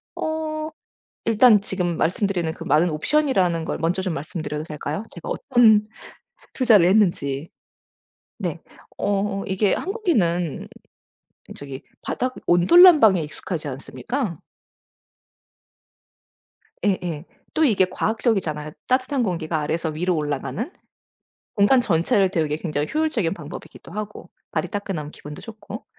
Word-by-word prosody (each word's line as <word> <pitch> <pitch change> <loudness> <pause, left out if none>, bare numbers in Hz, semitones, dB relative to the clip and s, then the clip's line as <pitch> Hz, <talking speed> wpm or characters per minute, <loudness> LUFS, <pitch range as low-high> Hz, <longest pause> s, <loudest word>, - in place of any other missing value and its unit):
어 310 -1 -3 0.6
일단 225 -1 +6
지금 180 -4 -2
말씀드리는 175 -1 0
그 - - -9
많은 155 +5 +3
옵션이라는 180 - +1
걸 - - -3
먼저 170 +3 0
좀 185 -3 -2
말씀드려도 150 0 -4
될까요? 155 +4 -5
제가 170 - -8
어떤 220 -3 +4 0.7
투자를 225 -9 +5
했는지. 170 -7 +2 0.9
네. - - -3 0.4
어 195 0 -1
이게 190 +1 +1
한국인은 200 - 0 0.9
저기 140 -2 -8 0.2
바닥 255 +1 -2
온돌 175 - +6
난방에 225 - +7
익숙하지 155 +1 -5
않습니까. 190 - -4 2.5
예예. 180 -5 -1 0.3
또 320 - +2
이게 210 -9 +4
과학적이잖아요. 185 - -1 0.2
따뜻한 255 +1 +1
공기가 170 -6 -1
아래에서 160 +2 -1
위로 175 +3 -1
올라가는. 150 - -3 0.8
공간 215 +6 +5
전체를 190 -1 +2
데우기 155 -5 0
굉장히 150 -3 -2
효율적인 280 - +1
방법이기도 150 +1 -10
하고 210 +2 -7 0.2
발이 - - -1
따끈하면 195 -8 -4
기분도 150 -1 -10
좋고. 220 +1 -9
185 Hz, 290 characters per minute, -23 LUFS, 160-225 Hz, 2.5 s, 난방에